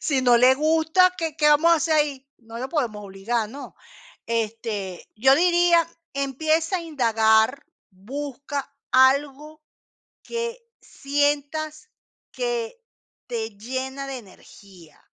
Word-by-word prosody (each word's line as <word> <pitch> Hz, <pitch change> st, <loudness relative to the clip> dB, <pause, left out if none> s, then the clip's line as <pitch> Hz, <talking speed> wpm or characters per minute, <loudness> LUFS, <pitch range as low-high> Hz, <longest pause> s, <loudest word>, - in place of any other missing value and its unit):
Si 275 Hz, -4 st, 0 dB
no 245 Hz, -1 st, +5 dB
le 255 Hz, +2 st, +6 dB
gusta, 320 Hz, +5 st, +3 dB
¿qué 325 Hz, -4 st, -4 dB
qué 300 Hz, -1 st, +3 dB
vamos 305 Hz, +3 st, +5 dB
a 335 Hz, -, +5 dB
hacer 320 Hz, 0 st, 0 dB
ahí? 280 Hz, -3 st, 0 dB
No 230 Hz, -1 st, -10 dB
lo 260 Hz, +2 st, -4 dB
podemos 230 Hz, -10 st, -2 dB
obligar, 210 Hz, +3 st, -3 dB
¿no? 275 Hz, +4 st, -10 dB, 0.5 s
Este, 220 Hz, -4 st, -4 dB
yo 265 Hz, +5 st, +5 dB
diría, 345 Hz, 0 st, +4 dB, 0.3 s
empieza 315 Hz, +6 st, 0 dB
a 345 Hz, -, -5 dB
indagar. 225 Hz, -4 st, +2 dB, 0.2 s
Busca 280 Hz, +7 st, -6 dB, 0.2 s
algo 280 Hz, +3 st, +2 dB, 0.6 s
que 470 Hz, +1 st, -4 dB, 0.2 s
sientas 290 Hz, +5 st, -2 dB, 0.4 s
que 485 Hz, -1 st, -3 dB, 0.5 s
te 225 Hz, -2 st, -4 dB
llena 265 Hz, +4 st, -5 dB
de 270 Hz, -1 st, -5 dB
energía, 190 Hz, -5 st, -17 dB
275 Hz, 120 wpm, -23 LUFS, 230-315 Hz, 0.6 s, le